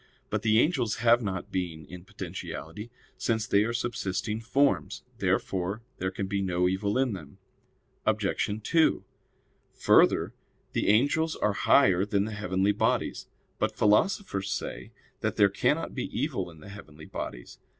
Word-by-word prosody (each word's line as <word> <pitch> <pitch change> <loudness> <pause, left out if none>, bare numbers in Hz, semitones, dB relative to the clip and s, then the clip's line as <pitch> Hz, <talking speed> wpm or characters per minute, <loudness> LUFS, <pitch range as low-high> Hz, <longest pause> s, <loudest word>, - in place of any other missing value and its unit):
But - - 0
the 110 0 +4
angels 125 -7 +1
have 120 +1 +4
not 95 -4 -4
being 85 -4 -3
in 90 0 -11
potentiality, 105 +2 -7 0.3
since 110 -1 0
they 100 -2 +3
are 115 - -1
subsisting 110 -3 -2
forms. 135 +5 +1 0.2
Therefore 95 +4 -1 0.2
there 95 - -1
can 95 +1 -4
be 100 0 -1
no 90 -1 +1
evil 100 +4 0
in 130 -3 +1
them. 75 -7 -9 0.7
Obj. 110 -2 +1
2: 160 +5 +3 0.7
Further, - - +4 0.4
the - - -1
angels 145 +9 +3
are 105 - 0
higher 95 -4 +4
than 100 0 0
the 110 - -5
heavenly 100 -1 0
bodies. 105 - 0 0.3
But - - 0
philosophers 105 - +2
say 100 - -5 0.3
that - - -1
there - - +5
cannot - - 0
be - - -3
evil - - -2
in 80 -2 -15
the 100 - -11
heavenly 80 -6 -11
bodies. - - -7
105 Hz, 150 wpm, -28 LUFS, 95-115 Hz, 0.7 s, there